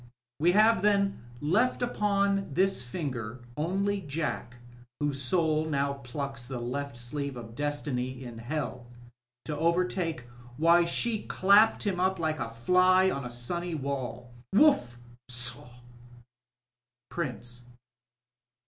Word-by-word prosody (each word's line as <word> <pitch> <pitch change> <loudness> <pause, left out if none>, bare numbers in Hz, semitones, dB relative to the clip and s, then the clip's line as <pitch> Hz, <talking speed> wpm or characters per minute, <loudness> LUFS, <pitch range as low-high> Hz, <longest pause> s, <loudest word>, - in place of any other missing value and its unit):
We 175 +4 +4
have 215 0 +5
then 200 -1 +2 0.2
left 215 +13 +2
upon 200 -4 +1
this 190 -4 +2
finger, 125 -3 -5
only 195 +6 0
Jack 145 -6 -3 0.4
whose 145 -2 0
sotil 155 +2 +1
now 140 -1 -1
pluclcs 135 -1 -4
the 130 -2 -4
left 130 +2 -4
sleeve 140 +2 -4
of 115 -1 -9
Destiny 135 -2 -2
in 120 -2 -8
Hell 120 -1 -4 0.6
to 150 - -3
overtake 170 -1 0 0.4
why 170 +2 +5
she 215 +5 -1
clapped 200 +4 +5
him 195 -4 -1
up 190 +1 +2
like 155 -2 -1
a 115 - -3
fly 185 +10 +4
on 140 -2 -4
a - - -4
stmny 160 +8 -3
wall 125 -3 -4 0.2
Whuff! 195 - +4 0.3
Sohl 120 0 -1 1.4
Prxncb. 120 -6 -4
150 Hz, 120 wpm, -29 LUFS, 125-185 Hz, 1.4 s, have